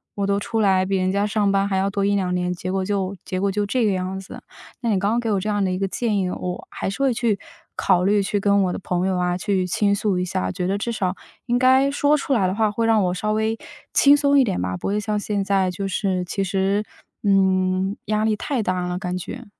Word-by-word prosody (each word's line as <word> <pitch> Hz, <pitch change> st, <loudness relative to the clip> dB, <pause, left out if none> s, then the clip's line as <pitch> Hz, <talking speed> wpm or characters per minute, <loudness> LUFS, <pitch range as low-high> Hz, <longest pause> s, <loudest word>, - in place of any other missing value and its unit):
我 200 Hz, -, -1 dB
都 200 Hz, 0 st, +1 dB
出 225 Hz, +2 st, -2 dB
来 190 Hz, -2 st, +3 dB
比 195 Hz, -, -1 dB
人 185 Hz, 0 st, +1 dB
家 200 Hz, +1 st, +1 dB
上 210 Hz, -1 st, +1 dB
班 195 Hz, 0 st, +2 dB
还 195 Hz, -, -1 dB
要 195 Hz, +1 st, +1 dB
多 200 Hz, 0 st, -1 dB
1-2 195 Hz, -3 st, +1 dB
年， 180 Hz, 0 st, -1 dB
结 185 Hz, +1 st, -5 dB
果 190 Hz, -1 st, -1 dB
就 200 Hz, -1 st, -1 dB
结 185 Hz, -, -3 dB
果 200 Hz, 0 st, +1 dB
就 205 Hz, +1 st, -1 dB
这 230 Hz, +3 st, +1 dB
个 205 Hz, -, +2 dB
样 185 Hz, 0 st, -2 dB
子。 190 Hz, -, -10 dB, 0.4 s
那 235 Hz, -, -1 dB
你 200 Hz, -, +2 dB
刚 200 Hz, +3 st, +1 dB
刚 235 Hz, -, +1 dB
给 235 Hz, -2 st, -2 dB
我 200 Hz, -, +2 dB
这 210 Hz, +3 st, -3 dB
样 205 Hz, -1 st, +1 dB
的 -, -, 0 dB
一 185 Hz, -, -1 dB
个 195 Hz, -, 0 dB
建 220 Hz, 0 st, -1 dB
议， 185 Hz, -1 st, 0 dB
我 180 Hz, 0 st, -5 dB
还 -, -, -4 dB
是 195 Hz, -, -5 dB
会 270 Hz, -2 st, +3 dB
去 225 Hz, -3 st, 0 dB, 0.4 s
考 180 Hz, -2 st, +2 dB
虑 205 Hz, +1 st, +3 dB
去 205 Hz, +1 st, -1 dB
跟 200 Hz, 0 st, +3 dB
我 180 Hz, -, 0 dB
的 -, -, -4 dB
朋 180 Hz, -1 st, -1 dB
友 190 Hz, -1 st, 0 dB
啊 180 Hz, 0 st, 0 dB
去 190 Hz, -1 st, 0 dB
倾 200 Hz, +3 st, +1 dB
诉 200 Hz, -2 st, 0 dB
一 180 Hz, -, 0 dB
下， 95 Hz, -, -2 dB
觉 180 Hz, -, -3 dB
得 195 Hz, +2 st, 0 dB
至 210 Hz, -, -3 dB
少 190 Hz, -5 st, -1 dB, 0.3 s
应 240 Hz, -, +2 dB
该 260 Hz, +2 st, +5 dB
说 285 Hz, +1 st, +3 dB
出 290 Hz, -, -3 dB
来 195 Hz, -6 st, +2 dB
的 185 Hz, -, -1 dB
话 215 Hz, -1 st, +2 dB
会 230 Hz, +2 st, -1 dB
让 220 Hz, -2 st, +3 dB
我 180 Hz, -, 0 dB
稍 210 Hz, +4 st, -1 dB
微 220 Hz, +1 st, 0 dB, 0.4 s
轻 285 Hz, +1 st, +6 dB
松 285 Hz, -1 st, +3 dB
一 -, -, +6 dB
点 195 Hz, -, -1 dB
吧， 90 Hz, 0 st, -2 dB
不 -, -, -5 dB
会 205 Hz, +1 st, 0 dB
像 210 Hz, 0 st, -1 dB
现 205 Hz, -1 st, -2 dB
在 195 Hz, -2 st, +1 dB
就 195 Hz, +2 st, -4 dB
是 190 Hz, -2 st, -1 dB
其 195 Hz, +3 st, -2 dB
实 195 Hz, +2 st, 0 dB, 0.4 s
嗯， 190 Hz, 0 st, +2 dB
压 215 Hz, 0 st, 0 dB
力 220 Hz, -1 st, +2 dB
太 260 Hz, -1 st, -2 dB
大 185 Hz, -2 st, -1 dB
了 180 Hz, 0 st, -2 dB
感 180 Hz, -2 st, -3 dB
觉。 245 Hz, +7 st, -7 dB
200 Hz, 285 characters per minute, -22 LUFS, 185-215 Hz, 0.4 s, 轻